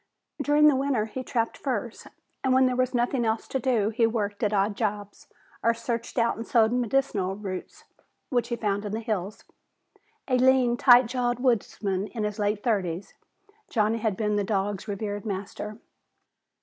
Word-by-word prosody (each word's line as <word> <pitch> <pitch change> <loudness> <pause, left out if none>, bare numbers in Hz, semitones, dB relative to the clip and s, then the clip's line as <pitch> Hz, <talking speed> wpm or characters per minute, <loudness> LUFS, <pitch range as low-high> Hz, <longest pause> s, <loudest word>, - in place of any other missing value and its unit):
During 295 +1 +4
the 295 - +5
winter, 265 -5 0
he 240 +4 -6
trapped 230 -3 -1
furs, 240 -4 -4 0.4
and 260 -1 +3
when 260 0 +5
there 255 -1 +1
was 255 0 0
nothing 240 +1 +1
else 220 0 -1
to 265 - -1
do 230 -5 +1
he 225 +1 +2
worked 205 -3 -2
at 210 -3 +1
odd 205 0 +1
jobs 205 -2 -4 0.3
or 230 0 +2
searched 230 +1 -4
out 235 -1 +2
and 230 - -6
sold 225 -1 +3
medicinal 235 -6 0
roots 195 -3 -7 0.5
which 245 -3 +1
he 240 - -2
found 205 -3 -1
in 205 -1 -5
the 220 - -1
hills. 215 -3 -4 0.8
A 255 -2 +2
lean, 255 -2 +4
tight 245 0 +7
jawed 245 0 -1
woodsman 205 -5 0
in 220 -2 -5
his 210 0 -3
late 205 0 0
thirties, 190 -6 -1 0.6
Johnny 220 0 +1
had 215 -4 -1
been 210 -2 0
the 205 - +1
dog's 200 0 -2
revered 205 0 -4
master. 205 +1 -5
225 Hz, 175 wpm, -26 LUFS, 205-245 Hz, 0.8 s, tight